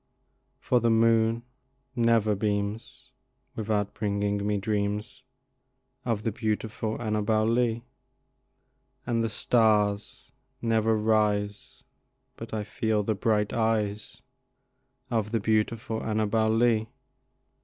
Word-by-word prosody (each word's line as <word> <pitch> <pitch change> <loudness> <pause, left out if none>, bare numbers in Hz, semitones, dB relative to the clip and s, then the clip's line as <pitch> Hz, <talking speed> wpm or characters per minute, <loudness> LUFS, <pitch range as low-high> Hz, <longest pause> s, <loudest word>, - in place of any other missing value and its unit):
For 125 - +1
the 120 0 +2
moon 115 0 +3 0.5
never 115 -3 +3
beams 100 +1 -3 0.4
without 105 -2 -1
bringing 100 -1 -1
me 105 -1 +1
dreams 105 0 -2 0.8
Of 115 -3 -1
the 115 - 0
beautiful 110 0 -3
Annabel 110 -1 +1
Lee, 115 0 +1 1.2
And 115 -1 0
the 115 - 0
stars 105 -2 +1 0.3
never 115 -1 +2
rise 105 -1 0 0.5
but - - -9
I 110 -1 -2
feel 105 0 -1
the 110 - 0
bright 105 0 0
eyes 110 -2 -1 0.9
Of 110 -3 0
the 115 0 0
beautiful 110 +2 0
Annabel 110 0 +1
Lee. 110 -1 +2
110 Hz, 100 wpm, -27 LUFS, 105-115 Hz, 1.2 s, moon